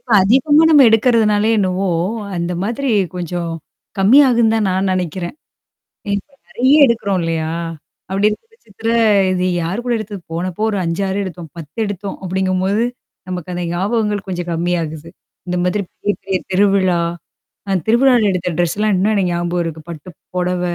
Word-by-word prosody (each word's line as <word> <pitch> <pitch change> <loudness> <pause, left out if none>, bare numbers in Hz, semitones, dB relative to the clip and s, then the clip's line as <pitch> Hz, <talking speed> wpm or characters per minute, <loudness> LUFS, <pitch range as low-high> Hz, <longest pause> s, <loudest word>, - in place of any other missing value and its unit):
இப்ப 245 - -16
அதிகமா 270 +9 +4
நம்ம 295 -3 +7
எடுக்கறதுனாலே 220 -2 +3
என்னவோ! 190 -1 0 0.5
அந்த 170 +1 -2
மாதிரி 240 +6 -2 0.3
கொஞ்சம் 175 -1 -3 0.5
கம்மியாகும் 235 +2 +5
தான் 220 -2 +1
நான் 190 +1 0
நெனைக்கிறேன். 180 - -3 0.8
ஏன்னா 200 +8 -4
நெறைய 260 +4 +2
எடுக்குறோம் 200 -6 0
இல்லையா? 165 -1 -2 0.6
அப்டி 200 +2 +2
இருக்கும் 450 - -6
பட்சத்துல, 225 - -6 0.4
இது 180 0 0 0.2
யார் 190 +9 -3
கூட 245 - -1
எடுத்தது 205 -3 -7
போனப்போ 180 +4 -3
ஒரு 200 - -2
5, 165 +3 -2
6 195 +1 -1
எடுத்தோம். 175 -3 -8
10 155 -1 -11
எடுத்தோம் 200 -1 -5
அப்படிங்கும்போது. 190 +3 0 0.4
நமக்கு 180 -1 -5
அந்த 175 - -3
ஞாபகங்கள் 205 +2 -1
கொஞ்சம் 175 -1 -4
கம்மியாகுது. 165 -2 -2 0.4
இந்த 180 - -1
மாதிரி 190 +3 0
பெரிய, 205 - -2
பெரிய 190 -1 0
திருவிழா 190 -2 +3 0.7
அ - - +1
திருவிழாவல 240 -1 +4
எடுத்த 180 -1 -2
ட்ரெஸ்லாம் 205 +5 +1
இன்னும் 205 +4 +2
எனக்கு 185 -4 +1
ஞாபகம் 175 0 -1
இருக்கு. 160 -1 -5
பட்டு 165 +1 -8 0.3
பொடவ, 180 0 -1
190 Hz, 150 wpm, -18 LUFS, 175-215 Hz, 0.8 s, நம்ம